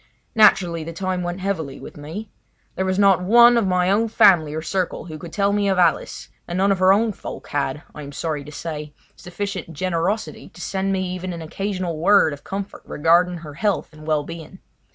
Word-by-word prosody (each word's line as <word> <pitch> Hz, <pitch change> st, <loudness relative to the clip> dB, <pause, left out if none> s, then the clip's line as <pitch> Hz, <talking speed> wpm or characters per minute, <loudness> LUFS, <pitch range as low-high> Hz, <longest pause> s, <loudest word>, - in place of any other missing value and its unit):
Naturally 180 Hz, -6 st, +4 dB
the 165 Hz, +1 st, -7 dB
time 185 Hz, +1 st, -2 dB
went 175 Hz, +1 st, -4 dB
heavily 160 Hz, -8 st, -3 dB
with -, -, -10 dB
me. 165 Hz, +9 st, -8 dB, 0.4 s
There 190 Hz, -, -2 dB
was 185 Hz, 0 st, 0 dB
not 195 Hz, -2 st, +5 dB
one 235 Hz, +5 st, +6 dB
of 230 Hz, -4 st, +2 dB
my 180 Hz, 0 st, +2 dB
own 220 Hz, +3 st, +2 dB
family 195 Hz, -9 st, +5 dB
or 160 Hz, -, -2 dB
circle 185 Hz, 0 st, -2 dB
who 155 Hz, -3 st, -8 dB
could 165 Hz, +2 st, -9 dB
tell 200 Hz, +2 st, +1 dB
me 205 Hz, -1 st, +1 dB
of 190 Hz, -, +1 dB
Alice, 175 Hz, -3 st, +1 dB, 0.2 s
and 175 Hz, -, -3 dB
none 195 Hz, +1 st, +3 dB
of 195 Hz, -, +1 dB
her 185 Hz, 0 st, +5 dB
own 215 Hz, +2 st, +2 dB
folk -, -, -9 dB
had, 145 Hz, +1 st, -2 dB
I 150 Hz, -, -9 dB
am 140 Hz, -1 st, -8 dB
sorry 150 Hz, 0 st, -3 dB
to 150 Hz, -, -10 dB
say, 150 Hz, 0 st, -6 dB, 0.2 s
sufficient 185 Hz, -2 st, -6 dB
generosity 185 Hz, +5 st, -2 dB
to -, -, -13 dB
send 195 Hz, +1 st, -2 dB
me 190 Hz, -1 st, -1 dB
even 185 Hz, 0 st, -5 dB
an 165 Hz, -1 st, -6 dB
occasional 185 Hz, -1 st, -3 dB
word 175 Hz, -3 st, +4 dB
of 145 Hz, -, -10 dB
comfort 195 Hz, 0 st, -6 dB
regarding 175 Hz, +3 st, +2 dB
her 155 Hz, -3 st, -10 dB
health 200 Hz, -1 st, -1 dB
and 155 Hz, 0 st, -13 dB
well 155 Hz, -2 st, +1 dB
being. 165 Hz, +3 st, -9 dB
180 Hz, 210 wpm, -22 LUFS, 160-195 Hz, 0.4 s, one